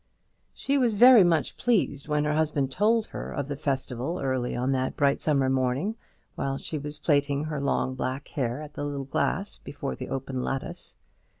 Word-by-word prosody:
She 280 +1 0
was 240 -4 +2
very 245 -1 +9
much 165 -4 +1
pleased 185 - +1
when 150 -1 +1
her 150 0 0
husband 150 -3 0
told 215 - +2
her - - -7
of 140 -2 -3
the 145 - -3
festival 135 +2 -2
early 130 -2 -1
on 125 +2 0
that 130 -1 -1
bright 140 0 +2
summer 140 -4 +2
morning, 130 - 0 0.4
while 135 0 -2
she 155 +2 -5
was 150 +1 -5
plaiting 145 -2 +1
her 155 -2 -3
long 140 -2 0
black 130 +2 -4
hair 130 +1 -2
at 150 0 -10
the - - -5
little 140 -1 -3
glass 135 - -1
before 65 - -5
the - - -7
open 130 -1 -3
lattice. 135 0 -5
140 Hz, 185 wpm, -27 LUFS, 130-155 Hz, 0.4 s, very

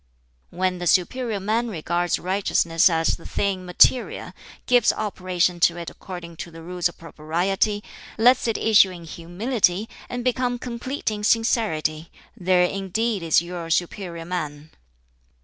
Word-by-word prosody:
"When 185 0 -1
the 175 - -3
'superior 220 +5 +1
man' 220 +5 0
regards 175 -2 -1
righteousness 180 -2 +2
as 165 -1 +1
the 165 - -16
thing 190 -2 -2
material, 210 +7 +2 0.3
gives 245 -3 +4
operation 180 -4 -1
to 170 0 +3
it 170 -1 -6
according 175 -3 -9
to 170 - -6
the 165 0 -12
Rules 180 0 -1
of - - -15
Propriety, 175 +6 -1 0.3
lets 245 +2 +4
it 225 - 0
issue 210 -3 +5
in 175 -2 -9
humility, 180 +5 -1 0.2
and 245 0 -4
become 250 0 0
complete 245 +1 -4
in 210 -1 -5
sincerity 170 -9 +1 0.3
there 180 0 +3
indeed 195 +3 -1
is 165 0 +3
your 170 -1 -6
superior 170 0 -2
man! 155 -4 -5
180 Hz, 140 wpm, -23 LUFS, 170-215 Hz, 0.3 s, issue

